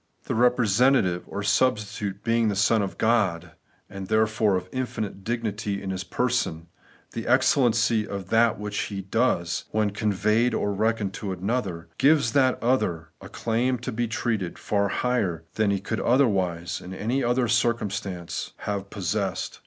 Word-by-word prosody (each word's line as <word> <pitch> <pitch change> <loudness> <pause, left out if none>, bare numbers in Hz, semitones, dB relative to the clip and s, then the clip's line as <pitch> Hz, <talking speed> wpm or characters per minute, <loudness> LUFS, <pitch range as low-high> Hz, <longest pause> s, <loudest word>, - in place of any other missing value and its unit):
The - - -3
representative 120 -4 +3
or 100 +1 -5
substitute 105 -4 0
being 115 0 +2
the 105 - 0
Son 110 +2 +3
of 100 - -4
God, 95 -8 +1 0.4
and 95 -1 -8
therefore 110 -1 +2
of 90 0 -3
infinite 110 -6 -4
dignity 105 -3 -2
in 95 -1 -4
His 95 -1 -3
person, 90 -6 -1 0.4
the 115 - -5
excellency 120 -4 +3
of 100 -2 -6
that 115 0 +3
which 105 0 -3
He 100 - -3
is - - -3
and 95 - -26
does, 90 -8 +1
when 105 -1 +1
conveyed 105 +3 +1
or 105 0 0
reckoned 110 -1 0
to 100 -3 -3
another, 95 -2 -3
gives 140 -5 +4
that 130 -2 +3
other 85 -10 0
a - - -10
claim 120 +3 0
to 120 - -5
be 120 +2 -1
treated 110 -5 -2
far 100 -1 0
higher 100 -8 -1
than 110 -2 +1
he 100 -1 +1
could 110 +3 -3
otherwise 95 -9 +1
in 95 +1 -8
any 120 +8 -1 0.3
circumstances 100 -6 -1
have 100 -1 -4
possessed. 95 -5 -3
105 Hz, 155 wpm, -25 LUFS, 95-120 Hz, 0.4 s, gives